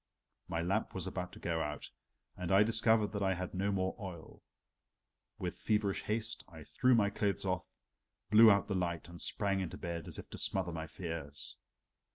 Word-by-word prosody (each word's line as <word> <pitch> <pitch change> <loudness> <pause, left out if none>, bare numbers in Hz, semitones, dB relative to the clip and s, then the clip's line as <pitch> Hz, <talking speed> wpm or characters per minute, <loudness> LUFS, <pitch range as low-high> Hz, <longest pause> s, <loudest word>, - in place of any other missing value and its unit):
My 85 0 -1
lamp 95 +5 0
was 95 - -1
about 90 -1 -4
to - - -10
go 80 -1 -1
out 75 -1 -4 0.4
and 90 -2 -3
I 100 +2 +7
discovered 110 -1 +3
that 100 - -3
I 95 -1 +2
had 90 +1 -4
no 100 +2 0
more 95 -1 0
oil. 90 -6 -8 1.0
With - - -4
feverish 105 -2 +1
haste 110 +1 -2
I 80 -3 -11
threw 125 +8 +3
my 100 -3 +3
clothes 100 -1 -1
off, 95 -1 -1 0.6
blew 110 +1 +9
out 100 -1 +4
the 100 - -1
light 85 -3 -1
and 85 0 -7
sprang 100 -2 +1
into 95 -3 -4
bed 85 -2 -4
as - - -3
if - - -8
to - - -4
smother 95 -2 +1
my 80 -1 -4
fears. 80 -4 -5
95 Hz, 190 wpm, -34 LUFS, 85-100 Hz, 1.0 s, blew